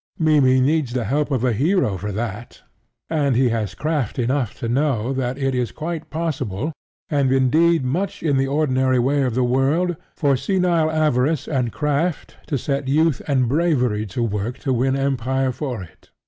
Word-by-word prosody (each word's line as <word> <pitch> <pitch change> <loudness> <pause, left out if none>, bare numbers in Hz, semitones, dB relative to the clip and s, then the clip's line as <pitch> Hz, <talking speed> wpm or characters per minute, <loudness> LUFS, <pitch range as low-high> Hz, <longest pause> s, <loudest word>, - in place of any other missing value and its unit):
Mimmy 145 -5 +4
needs 140 -1 +1
the 125 -2 -1
help 145 +8 0
of 130 -4 -1
a 125 -2 +2
hero 145 - +1
for 105 +3 -4
that; 110 +2 -5 0.4
and 145 -5 +1
he 125 0 +3
has 110 -5 -2
craft 150 - -2
enough 125 -1 -1
to 115 - -4
know 130 -1 0
that 130 -1 -2
it 135 -1 -1
is 125 -2 -1
quite 160 0 -5
possible, 155 - -3 0.3
and 140 -4 +1
indeed 145 +4 +3
much 185 +9 -2
in 150 -4 +2
the 135 0 +1
ordinary 130 -3 +1
way 135 +4 +2
of 125 -4 0
the 130 - +2
world, 140 +8 +1 0.2
for 140 -3 +2
senile 175 +1 +1
avarice 155 -2 +1
and 125 -5 -1
craft 150 +4 -1
to 145 - -1
set 140 +1 -2
youth 155 +1 +2
and 130 -4 +2
bravery 125 -8 +1
to 110 +5 -3
work 110 +3 -2
to 135 -1 -1
win 130 +2 +1
empire 135 -1 0
for 125 -5 -4
it. 85 - -17
135 Hz, 175 wpm, -21 LUFS, 125-155 Hz, 0.4 s, Mimmy